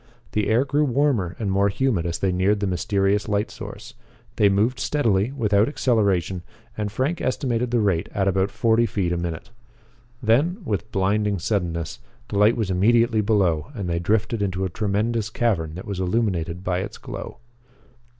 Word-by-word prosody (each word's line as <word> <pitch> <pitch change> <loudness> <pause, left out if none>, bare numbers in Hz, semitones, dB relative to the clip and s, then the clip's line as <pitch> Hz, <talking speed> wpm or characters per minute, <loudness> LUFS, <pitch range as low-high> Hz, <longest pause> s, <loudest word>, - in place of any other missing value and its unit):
The 105 -1 0
air 120 +5 +3
grew 145 +2 +1
warmer 125 - +1
and 105 -4 -2
more 100 +1 +3
humid 100 -6 0
as 85 - -2
they 95 - 0
neared 95 +3 +2
the 100 - -1
mysterious 100 +2 0
light 105 0 0
source. - - -9 0.4
They 105 - +5
moved 110 +6 +1
steadily, 115 -6 +1
without 105 -5 +2
acceleration, 100 - +1 0.3
and 105 -1 -3
Frank 135 +10 -1
estimated 125 -2 -1
the 120 -1 +2
rate 95 -3 0
at 100 -1 0
about 95 0 +2
forty 115 +2 +2
feet 95 -4 -1
a 90 - 0
minute. 85 -2 -5 0.7
Then, 135 - +2
with 105 +1 -3
blinding 100 +1 +1
suddenness, 85 -4 -2 0.3
the 100 - -1
light 105 +3 +5
was 105 -5 -1
immediately 115 +4 +3
below 95 -7 +1
and 100 -5 -4
they 85 -1 0
drifted 105 +4 0
into 95 -1 -1
a - - -2
tremendous 110 +3 -1
cavern 95 -10 -1
that 90 - -7
was 100 -2 -4
illuminated 90 -3 -1
by 90 -1 0
its 95 - -5
glow. - - -8
100 Hz, 170 wpm, -23 LUFS, 95-115 Hz, 0.7 s, They